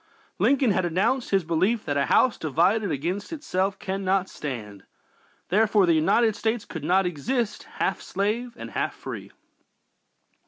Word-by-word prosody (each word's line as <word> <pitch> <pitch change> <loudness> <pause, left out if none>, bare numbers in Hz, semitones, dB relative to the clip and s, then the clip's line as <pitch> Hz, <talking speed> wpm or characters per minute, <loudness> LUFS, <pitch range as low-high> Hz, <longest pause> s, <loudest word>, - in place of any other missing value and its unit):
Lincoln 270 -4 +3
had 185 -1 +1
announced 205 +9 0
his 195 -2 +2
belief 185 +8 +1
that 145 - -1
"a 140 - +1
house 255 - +4
divided 175 +8 +2
against 175 +8 -3
itself 195 - -1
cannot 190 0 -1
stand;" 105 -9 -6 0.7
therefore 210 +1 +4
the 170 - +4
United 215 +8 +3
States 225 0 -1
could - - -7
not 190 +1 +3
long 180 - 0
exist 230 - -2
"half - - -1
slave 220 +5 -2
and - - -8
half - - -2
free." - - -8
195 Hz, 150 wpm, -25 LUFS, 170-220 Hz, 0.7 s, house